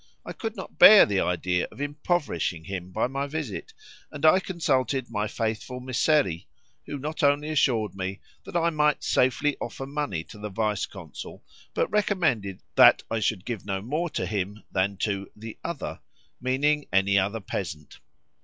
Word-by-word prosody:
I - - -6
could 225 0 -5
not 190 - -9
bear 215 -1 +10
the 100 -2 0
idea 90 0 0
of - - -14
impoverishing 145 - -1
him 90 0 -6
by 110 - 0
my 135 +3 -2
visit, 155 - -5 0.4
and 150 0 -3
I 160 +4 +7
consulted 135 - -1
my 105 -1 -1
faithful 115 +3 -3
Mysseri, 130 - +1 0.4
who 145 - -4
not 155 +5 -4
only 145 +1 +3
assured 120 -8 +1
me 95 +1 -4 0.2
that - - -11
I 170 0 +2
might 150 -1 +2
safely 130 +3 +2
offer 135 - -5
money 140 - -3
to 105 - -13
the 105 0 -5
vice 105 0 -1
consul, 90 -6 -10 0.3
but - - +2
recommended 160 - 0
that - - +7
I 115 - +1
should 105 -2 -1
give 115 -5 -4
no 95 -1 -2
more 150 - -2
to 95 - -2
him 105 +2 -3
than 95 +1 0
to 100 -2 -3
"the 110 +1 -9
others," 170 -3 -5 0.4
meaning 145 +4 +1
any 100 +1 +4
other 100 +4 -1
peasant. 85 -6 -6
120 Hz, 165 wpm, -26 LUFS, 100-150 Hz, 0.4 s, bear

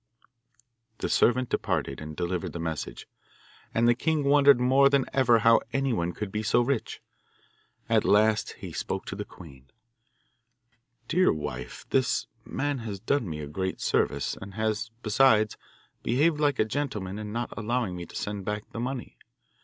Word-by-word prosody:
The - - -3
servant 125 +1 +3
departed - - -1
and 75 0 -7
delivered 90 0 -2
the 85 - -5
message, 80 -3 -5 0.6
and 115 +1 +2
the 120 - +6
king 155 +4 0
wondered 140 -2 +6
more 135 +2 +5
than 140 -2 +2
ever 125 -3 +5
how 115 +1 +5
anyone 125 -11 0
could 105 +1 -5
be 105 - -2
so 110 +2 +2
rich. 125 -1 -2 0.8
At - - +3
last 110 +1 +3
he - - -9
spoke - - -3
to - - -5
the - - -5
queen: 70 -7 -14 1.4
'Dear 185 +2 +4
wife, 75 -4 -5
this 125 -3 +2 0.2
man 145 +3 -2
has 105 -4 -5
done 115 -1 0
me 75 -1 -5
a 75 - -6
great 95 +5 -3
service, - - 0
and 95 0 -9
has, 110 +1 -1
besides, 110 -1 +4 0.5
behaved 150 +6 +2
like 145 -3 +2
a - - +3
gentleman 110 -6 -3
in 105 -1 -6
not 120 +1 -3
allowing 115 -2 -1
me 85 -1 -7
to - - -14
send 105 -1 -4
back 105 +2 -4
the - - -6
money. 125 +1 -5
110 Hz, 160 wpm, -27 LUFS, 95-130 Hz, 1.4 s, the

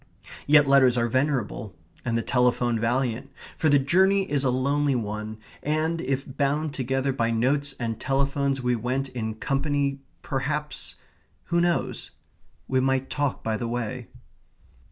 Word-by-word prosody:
Yet 145 -1 +6
letters 130 -3 +5
are 120 0 +2
venerable; 120 -6 -1 0.3
and 115 -2 0
the 115 - -1
telephone 120 -1 +2
valiant, 125 +2 0 0.3
for 155 - +2
the 145 - +6
journey 190 +8 +3
is 145 -2 +1
a 130 - +2
lonely 140 +2 +1
one, 110 -1 -4 0.2
and 155 +2 0
if 135 -3 -1
bound 145 +2 -1
together 135 0 -1
by 115 -3 0
notes 135 +5 +1
and 115 -2 -3
telephones 140 0 0
we 125 0 +2
went 130 +4 -2
in 110 -3 -4
company, 140 +2 0 0.2
perhaps 145 +2 -3 0.5
who 170 0 +1
knows? 175 0 0 0.6
we 130 - +2
might 135 0 0
talk 145 -3 -1
by 110 -1 -1
the 115 - -3
way. 120 +1 -3
135 Hz, 145 wpm, -26 LUFS, 120-145 Hz, 0.6 s, Yet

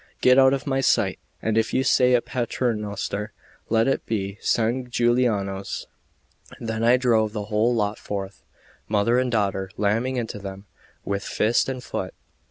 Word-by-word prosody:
Get 125 +1 +5
out 130 0 +6
of 135 -1 -1
my 135 -2 0
sight; - - +2 0.2
and 110 0 +2
if 110 - -1
you 130 - +3
say 125 -1 +4
a 120 - +1
Paternoster, 105 -4 -2 0.4
let 115 +1 +3
it 135 - 0
be 100 -2 -3
San 120 +2 0
Giuliano's." 115 -6 0 0.7
Then 110 -1 -3
I 120 +2 +5
drove 110 -4 +2
the 105 -2 -3
whole 115 +3 +3
lot 105 -1 -1
forth, 100 -1 -5 0.5
mother 110 +4 +2
and 130 -1 0
daughter, 100 -3 0
lamming 115 +6 0
into 115 -4 -3
them 100 0 -8 0.4
with 100 0 -2
fist 115 +4 +1
and 130 -2 -5
foot. - - -5
115 Hz, 160 wpm, -24 LUFS, 105-125 Hz, 0.7 s, out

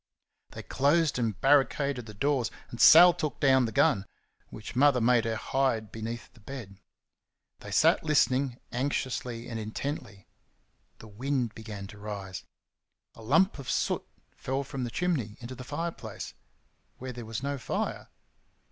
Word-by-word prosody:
They - - -9
closed 150 +1 +2
and 110 -4 -1
barricaded 135 -2 +2
the 105 - -10
doors, 135 +1 +1 0.2
and 120 - -4
Sal 175 +2 +9
took 155 -6 -4
down 130 -2 +4
the 115 - -3
gun, 100 -2 +2 0.4
which 105 +2 -9
Mother 140 0 +5
made 120 0 +3
her 115 -1 -1
hide 115 -2 -1
beneath 115 +2 -6
the - - -19
bed. 105 -4 -9 0.8
They - - -10
sat - - +4
listening, 135 -4 +2
anxiously 125 -2 -2
and 115 -2 -5
intently. 110 -2 -5 0.7
The 110 - -13
wind 125 +2 -2
began 105 -3 -8
to 105 +1 -12
rise. 100 -3 -6 0.7
A - - -14
lump 160 - +3
of 135 - -7
soot - - 0 0.3
fell 135 +2 -3
from 135 -2 -4
the - - -4
chimney 125 -7 -1
into 120 +1 -7
the 130 0 -8
fireplace 165 +6 -5 0.6
where 130 0 -6
there 120 0 -7
was 115 +3 -5
no 140 0 -2
fire. - - -3
125 Hz, 150 wpm, -29 LUFS, 110-140 Hz, 0.8 s, Sal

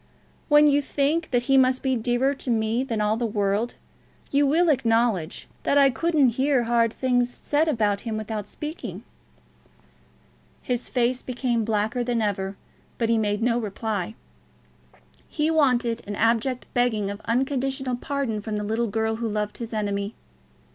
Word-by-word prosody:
"When 295 0 +7
you 290 -1 +4
think 290 +4 0
that 245 -2 +1
he 270 +1 +4
must 255 0 +2
be 265 -1 +1
dearer 245 +4 +1
to 270 - -7
me 225 +1 +1
than 230 -5 -2
all 210 +1 +1
the 235 0 -1
world, 205 +2 -1 0.6
you 285 0 +3
will 330 +4 +3
acknowledge 230 - +1
that 285 - +2
I 275 -1 +6
couldn't 310 -2 +2
hear 270 -2 +3
hard 230 -1 +2
things 245 0 +1
said 295 +5 0
of 210 -8 +1
him 225 -2 -3
without 215 -1 -4
speaking." 305 +7 -7 1.6
His 250 -1 -2
face 250 0 +1
became 245 -2 -1
blacker 220 +3 0
than 240 -1 0
ever, 195 -2 -2 0.4
but 230 -1 0
he 230 -1 +3
made 210 0 0
no 240 0 +2
reply. 215 -2 -3 1.1
He 310 +1 0
wanted 250 -7 +2
an 205 - -4
abject 235 +4 +1
begging 220 -5 +1
of 200 +1 -8
unconditional 265 +1 -1
pardon 260 -5 -2
from 210 0 -3
the 210 - -3
little 225 +3 -1
girl 220 +1 -1
who 230 -1 -2
loved 210 0 -3
his 230 -2 -6
enemy. 205 -1 -2
235 Hz, 160 wpm, -25 LUFS, 215-265 Hz, 1.6 s, When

